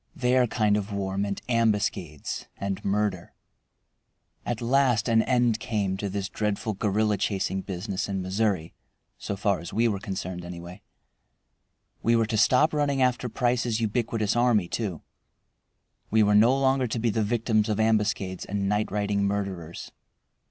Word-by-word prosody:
Their 125 -3 +3
kind 105 -2 +2
of 105 0 -4
war 95 -1 -2
meant 100 0 -2
ambuscades 105 - -1
and 100 -1 -3
murder. 100 -3 -1 1.1
At 120 -2 -1
last 125 -2 +2
an 115 -1 +4
end 120 -2 +2
came 105 -4 -1
to 100 0 -3
this 100 0 -3
dreadful 105 +2 -2
guerrilla 105 +1 +1
chasing 95 -1 -1
business 95 +1 -4
in 95 -1 -2
Missouri 95 -2 -1 0.5
so 100 - -4
far 100 -2 0
as 85 - -8
we 115 +2 +2
were 100 -4 -1
concerned, 95 -3 -5
anyway. 85 +2 -9 1.2
We 115 +1 +3
were 115 -1 +3
to 110 +1 -2
stop 130 +8 +4
running 145 -2 +1
after 125 -1 +1
Price's 120 -1 0
ubiquitous 110 -1 0
army 120 -6 +3
too. 95 -5 -3 1.1
We 110 0 +4
were 105 0 +3
no 115 +6 +5
longer 135 -1 +2
to 115 - -3
be 115 0 +1
the 110 - 0
victims 110 0 +1
of 105 0 0
ambuscades 105 -4 +1
and 100 0 -2
night 105 +1 0
riding 100 -1 0
murderers. 95 -5 -4
105 Hz, 150 wpm, -26 LUFS, 100-115 Hz, 1.2 s, no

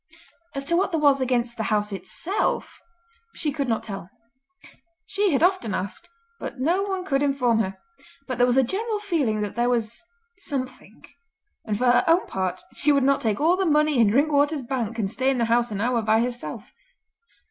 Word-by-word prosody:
As 275 0 -3
to 340 - +1
what 375 +3 +2
there 330 -4 -1
was 285 -2 +4
against 245 -2 0
the 220 - -2
house 210 -1 0
itself 200 - -2 0.5
she 300 - -1
could 280 -1 -2
not 225 - 0
tell. 195 -4 -7 1.0
She 410 0 +1
had 285 +2 +2
often 360 - +2
asked, 190 +1 -5 0.3
but 270 - -7
no 340 +9 +1
one 385 -2 -3
could 275 -5 0
inform 260 -5 +2
her; 190 -3 -2 0.5
but 255 -2 -4
there 245 - +5
was 250 +1 +2
a 265 - +6
general 425 - -2
feeling 310 - -1
that 210 -1 -4
there 240 +1 +1
was 235 -2 -1 0.4
something, 255 - -6 0.6
and 210 -2 -1
for 250 - 0
her 245 0 +5
own 335 +3 +4
part 185 -1 -3
she 295 - +2
would 280 -2 +3
not 275 +1 +2
take 215 -3 0
all 330 +4 +4
the 385 - 0
money 300 -4 +2
in 225 -3 +5
Drinkwater's 285 +3 +2
Bank 235 -3 -3
and 215 -4 0
stay 260 +6 0
in 270 - +1
the 235 - +1
house 235 +1 +2
an 205 -2 -4
hour 240 0 +1
by 220 0 +3
herself. 245 0 -5
255 Hz, 195 wpm, -24 LUFS, 225-300 Hz, 1.0 s, a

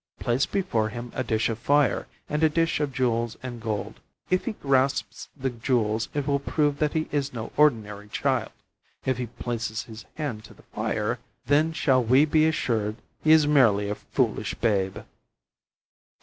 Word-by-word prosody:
Place 125 +3 +1
before 120 - 0
him 120 +2 -7
a 130 - -1
dish 110 -3 +1
of 115 -1 -3
fire 145 +2 +2 0.2
and 150 +1 -1
a 160 - +5
dish 165 +1 +1
of 145 -2 -1
jewels 120 -3 0
and 120 -2 -6
gold. 110 -2 -4 0.3
If 185 - +2
he 235 - -2
grasps 135 -5 0
the 130 -1 -1
jewels, 115 -2 0
it 145 -2 0
will 140 -1 +1
prove 145 0 0
that 150 -1 +1
he 155 -1 0
is 140 -3 -1
no 115 -2 -5
ordinary 105 -8 +2
child; - - 0 0.5
if 130 -1 0
he 125 - -2
places 115 -1 -4
his 110 -1 -11
hand 140 -9 -4
to - - -15
the - - -20
fire, - - -1 0.3
then 150 +3 +3
shall 130 -5 +2
we 130 +6 +5
be 155 +1 +3
assured 110 -9 0 0.3
he 155 - +4
is 160 -1 +7
merely 110 -9 +4
a - - +1
foolish - - -1
babe." 100 -4 0
130 Hz, 175 wpm, -26 LUFS, 110-150 Hz, 0.5 s, is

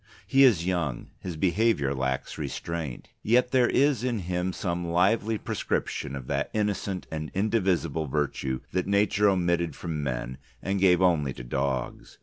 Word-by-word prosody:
He 135 0 +5
is 105 -11 +5
young: 85 -9 -2
his 90 -4 -6
behaviour 90 -5 +2
lacks 65 -1 -2
restraint. 80 -7 -5
Yet 125 +3 +3
there 125 -2 +4
is 140 -4 +2
in 120 -5 -1
him 90 +1 -1
some 85 -2 -3
lively 100 +6 +2
prescription 70 - -2
of 65 -2 -6
that 70 +2 -1
innocent 105 -3 -1
and 75 -1 -4
indivisible 95 -7 +1
virtue 65 -2 -2
that 90 +1 -1
Nature 100 +1 +3
omitted 85 -3 +1
from 80 -3 -4
men 65 -1 -3 0.2
and 95 +8 -1
gave 95 -1 +4
only 75 -7 +2
to - - -9
Dogs. 65 0 -3
90 Hz, 150 wpm, -27 LUFS, 70-100 Hz, 0.2 s, He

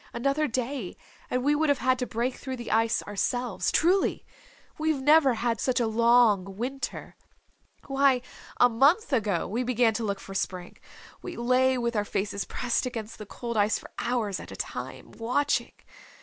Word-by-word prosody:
Another 275 +5 0
day 250 -5 -3 0.3
and 250 0 -1
we 290 +2 +3
would 305 +1 +1
have 285 - +3
had 255 -1 +1
to 250 - -2
break 240 +3 -1
through 260 0 -6
the 240 -2 -6
ice 225 +1 +2
ourselves. 205 -1 -1
Truly. 365 +4 +2 0.5
We've 310 -2 +1
never 285 -2 +5
had 230 -1 -1
such 255 -1 +1
a 235 - +2
long 220 -4 +3
winter. 265 +4 -5 0.7
Why, 270 -2 +2 0.3
a 245 - +6
month 280 - +3
ago 205 -8 +1
we 230 +6 -2
began 245 -2 +2
to 225 +1 -3
look 200 -2 -2
for 195 - -10
Spring. 185 -2 -4 0.4
We 355 - -7
lay 255 +2 +2
with 235 -1 -1
our 210 - +1
faces 200 0 -3
pressed 250 +1 -1
against 225 -3 -6
the 215 - -8
cold 235 +1 -5
ice 210 +1 +3
for - - -12
hours 225 -6 -1
at - - -10
a - - -7
time, - - -6
watching. 250 +2 0
240 Hz, 175 wpm, -27 LUFS, 220-265 Hz, 0.7 s, a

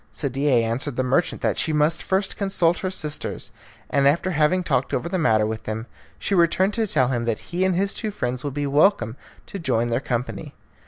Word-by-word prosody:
Sadie 135 -3 +1
answered 120 +4 -2
the 130 - 0
merchant 130 +7 0
that - - +1
she 160 - +2
must 150 +2 +2
first 190 +1 0
consult 180 -4 +1
her 185 - -2
sisters; 155 -5 -3 0.4
and 140 -1 +3
after 170 +6 +2
having 155 +3 +2
talked 135 -5 0
over - - -2
the 185 +2 -1
matter 110 -8 +3
with 110 0 -4
them, 110 +1 -4 0.3
she - - -2
returned 185 +3 +3
to 225 -1 0
tell 130 -9 +2
him 120 -2 -1
that 115 -2 0 0.2
he 180 +2 +1
and 190 -1 +2
his 195 +2 0
two 220 - -3
friends 125 -11 -3
would 140 -2 -4
be 145 0 -1
welcome 145 - +3 0.3
to 200 - -7
join 120 -7 0
their 115 - +1
company. 125 -2 -4
150 Hz, 210 wpm, -23 LUFS, 125-185 Hz, 0.4 s, and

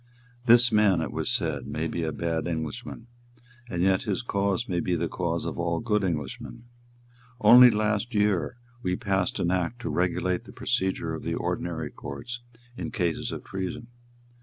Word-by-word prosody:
"This 120 0 +7
man," 105 -5 +4
it 80 - -3
was - - -1
said, - - -1
"may 80 +2 -2
be 85 - -3
a 80 -1 -1
bad 80 +2 -2
Englishman; 80 +6 -4 0.6
and 90 -4 -1
yet 95 0 +3
his 105 -1 -2
cause 100 0 0
may 90 -2 0
be 90 0 0
the 85 0 -1
cause 85 -1 -2
of - - -4
all 85 -1 0
good 105 -3 +1
Englishmen. 80 - -4 0.8
Only 125 +4 +9
last 110 +1 0
year 105 +2 +1 0.2
we 90 -5 0
passed 95 -1 0
an 85 - +1
Act 95 +6 -1
to - - -3
regulate 90 0 0
the - - -12
procedure 95 -3 -1
of 80 - -5
the - - -2
ordinary 80 -4 -3
courts 120 - -7 0.3
in - - -4
cases 85 -5 -1
of - - -6
treason. 95 +5 -5
95 Hz, 170 wpm, -27 LUFS, 85-105 Hz, 0.8 s, Only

